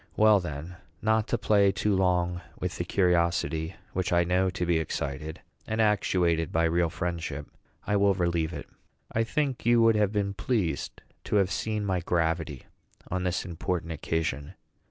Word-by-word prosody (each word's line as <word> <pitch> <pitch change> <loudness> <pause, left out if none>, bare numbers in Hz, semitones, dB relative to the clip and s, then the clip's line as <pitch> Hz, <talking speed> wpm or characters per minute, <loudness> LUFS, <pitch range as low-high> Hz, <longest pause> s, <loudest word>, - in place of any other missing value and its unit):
Well, 105 -1 +6
then, 85 +1 -6 0.2
not 110 0 +1
to - - 0
play 100 -2 +4
too 105 +1 0
long 90 -1 +1 0.2
with - - -3
the - - 0
curiosity 85 -2 +1 0.2
which 95 0 -1
I 85 0 +4
know 90 +2 +2
to 90 -1 -2
be 85 -1 +2
excited 75 0 -4 0.3
and 110 +1 -2
actuated 90 -6 +2
by 80 - +2
real 85 0 +2
friendship, 85 -4 -4 0.4
I 105 - +1
will 100 -1 +3
relieve 85 -3 0
it. 75 -4 -7 0.4
I 115 - +1
think 135 +2 -1
you 120 0 +4
would 115 -1 +5
have 105 -2 +2
been 100 -2 -1
pleased 100 - -2 0.2
to - - -1
have 100 -2 +3
seen 110 -1 -2
my 95 -2 0
gravity 80 -4 -1 0.5
on 90 0 -1
this 90 0 -1
important 85 -1 -3
occasion. 80 -2 -2
90 Hz, 165 wpm, -28 LUFS, 80-100 Hz, 0.5 s, Well